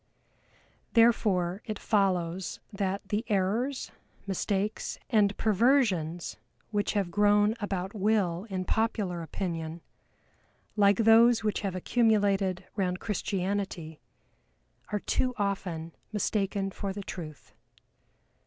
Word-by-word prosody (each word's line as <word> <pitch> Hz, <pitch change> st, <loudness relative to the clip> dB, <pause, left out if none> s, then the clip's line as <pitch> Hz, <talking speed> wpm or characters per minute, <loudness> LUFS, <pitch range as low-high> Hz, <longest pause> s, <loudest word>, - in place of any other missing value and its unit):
Therefore 205 Hz, -6 st, +3 dB
it 215 Hz, -2 st, -4 dB
follows, 185 Hz, -4 st, 0 dB
that 195 Hz, -1 st, -2 dB
the 210 Hz, +2 st, 0 dB
errors, 220 Hz, +7 st, 0 dB, 0.3 s
mistakes, 200 Hz, +2 st, -2 dB
and 205 Hz, -3 st, +3 dB
perversions 205 Hz, -, +2 dB, 0.3 s
which 205 Hz, -1 st, 0 dB
have 200 Hz, -4 st, 0 dB
grown 205 Hz, +1 st, +4 dB
about 195 Hz, -2 st, -3 dB
Will 200 Hz, -4 st, +1 dB
in 185 Hz, -1 st, -3 dB
popular 210 Hz, -6 st, 0 dB
opinion, 165 Hz, -1 st, -4 dB, 0.9 s
like 200 Hz, -2 st, +4 dB
those 225 Hz, +1 st, +6 dB
which 210 Hz, -1 st, 0 dB
have 195 Hz, -3 st, -2 dB
accumulated 200 Hz, -3 st, +2 dB
round 180 Hz, -3 st, -1 dB
Christianity, 195 Hz, -5 st, -3 dB, 0.9 s
are 210 Hz, -1 st, -1 dB
too 255 Hz, -1 st, 0 dB
often 185 Hz, -5 st, -2 dB, 0.2 s
mistaken 200 Hz, -1 st, -1 dB
for 195 Hz, 0 st, -4 dB
the 200 Hz, 0 st, -6 dB
truth. 155 Hz, -6 st, -8 dB
200 Hz, 100 wpm, -29 LUFS, 185-215 Hz, 0.9 s, those